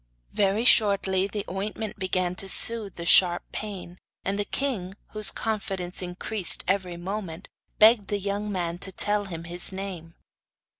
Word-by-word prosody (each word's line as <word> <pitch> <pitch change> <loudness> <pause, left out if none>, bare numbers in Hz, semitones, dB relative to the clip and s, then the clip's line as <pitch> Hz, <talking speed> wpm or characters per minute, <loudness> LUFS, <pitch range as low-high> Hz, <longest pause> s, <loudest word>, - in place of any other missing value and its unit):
Very 205 +3 0
shortly 195 -4 +3
the 205 0 -5
ointment 205 +3 -5
began 185 -1 -1
to 195 - -4
soothe 220 -4 +5
the 170 - -7
sharp 175 0 +5
pain, 190 -4 -7 0.3
and 200 +1 -2
the 205 - -1
king, 200 -8 -3
whose 215 -2 +6
confidence 195 -5 -4
increased 180 +2 0
every 185 -2 -1
moment, 185 -1 -6 0.3
begged 215 -2 +5
the 205 - -2
young 205 +1 -4
man 175 -2 -3
to 190 - -5
tell 205 +1 -1
him 165 -4 -8
his 175 +2 -1
name. 185 -4 -7
195 Hz, 150 wpm, -25 LUFS, 180-210 Hz, 0.3 s, whose